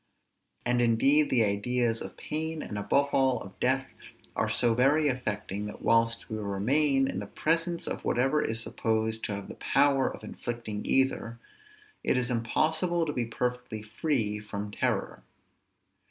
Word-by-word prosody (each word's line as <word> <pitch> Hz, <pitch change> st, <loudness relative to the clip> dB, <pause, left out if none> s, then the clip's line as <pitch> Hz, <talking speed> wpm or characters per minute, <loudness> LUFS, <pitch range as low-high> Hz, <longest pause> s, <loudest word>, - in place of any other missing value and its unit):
And 120 Hz, 0 st, +2 dB
indeed 135 Hz, +6 st, +4 dB
the 120 Hz, -3 st, +4 dB
ideas 115 Hz, +3 st, 0 dB
of -, -, -8 dB
pain, 160 Hz, +1 st, -3 dB
and, 105 Hz, -, -6 dB
above 120 Hz, +8 st, +1 dB
all, 130 Hz, -2 st, +3 dB
of 95 Hz, -1 st, -13 dB
death, 135 Hz, +1 st, +2 dB, 0.5 s
are -, -, 0 dB
so 120 Hz, -2 st, +2 dB
very 140 Hz, +6 st, +3 dB
affecting, 105 Hz, -5 st, -3 dB
that 105 Hz, -, -9 dB
whilst 115 Hz, 0 st, +2 dB
we 110 Hz, -1 st, -4 dB
remain 135 Hz, +8 st, +2 dB
in -, -, -3 dB
the -, -, -6 dB
presence 165 Hz, +2 st, 0 dB
of -, -, -4 dB
whatever 135 Hz, +5 st, +2 dB
is 110 Hz, 0 st, 0 dB
supposed 110 Hz, -1 st, -1 dB
to 100 Hz, -, -2 dB
have 100 Hz, -1 st, -6 dB
the -, -, -7 dB
power 140 Hz, -1 st, +2 dB
of -, -, -10 dB
inflicting 115 Hz, -3 st, -5 dB
either, 130 Hz, -3 st, +1 dB, 0.7 s
it -, -, +2 dB
is 125 Hz, 0 st, 0 dB
impossible 160 Hz, +9 st, +1 dB
to 150 Hz, -, -2 dB
be 120 Hz, -, -1 dB
perfectly 125 Hz, -2 st, -3 dB
free 110 Hz, -2 st, -1 dB
from 105 Hz, -1 st, -6 dB
terror. -, -, -1 dB
120 Hz, 155 wpm, -29 LUFS, 110-140 Hz, 0.7 s, indeed